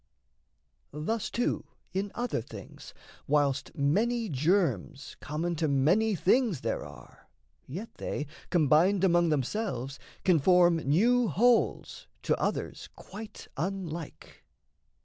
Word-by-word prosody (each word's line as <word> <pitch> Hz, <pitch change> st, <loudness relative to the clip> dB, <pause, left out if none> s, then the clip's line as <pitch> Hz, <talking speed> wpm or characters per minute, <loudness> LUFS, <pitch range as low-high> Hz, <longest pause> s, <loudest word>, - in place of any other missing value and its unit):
Thus, 180 Hz, +10 st, -2 dB
too, 240 Hz, -, -1 dB, 0.3 s
in 195 Hz, +1 st, -2 dB
other 245 Hz, -, -1 dB
things, -, -, -11 dB, 0.3 s
Whilst 145 Hz, -2 st, 0 dB
many 220 Hz, +11 st, +1 dB
germs 155 Hz, -1 st, 0 dB
common 165 Hz, +4 st, -3 dB
to 160 Hz, 0 st, +1 dB
many 175 Hz, +11 st, +3 dB
things 200 Hz, -, +2 dB
There -, -, -2 dB
are, -, -, -14 dB, 0.4 s
yet 190 Hz, -, -7 dB
they, 150 Hz, -, -3 dB, 0.2 s
combined 175 Hz, +4 st, +3 dB
among 175 Hz, -2 st, +4 dB
themselves, 140 Hz, -, -2 dB, 0.2 s
Can 180 Hz, -4 st, +4 dB
form 175 Hz, +2 st, +5 dB
new 220 Hz, -, +3 dB
wholes 235 Hz, +3 st, +1 dB, 0.2 s
to -, -, +2 dB
others -, -, -3 dB
quite 215 Hz, 0 st, -10 dB
unlike. 170 Hz, -1 st, -5 dB
175 Hz, 110 wpm, -29 LUFS, 150-210 Hz, 0.4 s, form